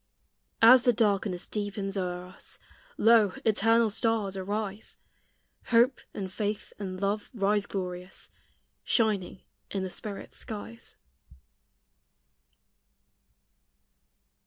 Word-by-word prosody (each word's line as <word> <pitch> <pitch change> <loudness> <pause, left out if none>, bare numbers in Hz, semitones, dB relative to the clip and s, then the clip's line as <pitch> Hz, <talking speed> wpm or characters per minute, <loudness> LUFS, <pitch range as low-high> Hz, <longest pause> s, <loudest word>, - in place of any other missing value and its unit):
As 250 +2 +9
the 245 -1 +3
darkness 200 -5 +1
deepens 205 -1 -3
o'er 180 -2 -3
us, 185 +1 -7 0.4
Lo! 225 -3 +5
eternal 225 +1 +4
stars 220 -3 0
arise; 205 +2 -4 0.7
Hope 240 +2 +3
and 190 -2 -6
Faith 210 0 -3
and 185 -2 -5
Love 200 +2 -1
rise 205 -1 +1
glorious, 180 -1 -6 0.5
Shining 210 -5 0 0.3
in 195 -1 -2
the 185 - -4
Spirit's 205 +1 -7
skies. 205 - -8
205 Hz, 90 wpm, -28 LUFS, 190-220 Hz, 0.7 s, As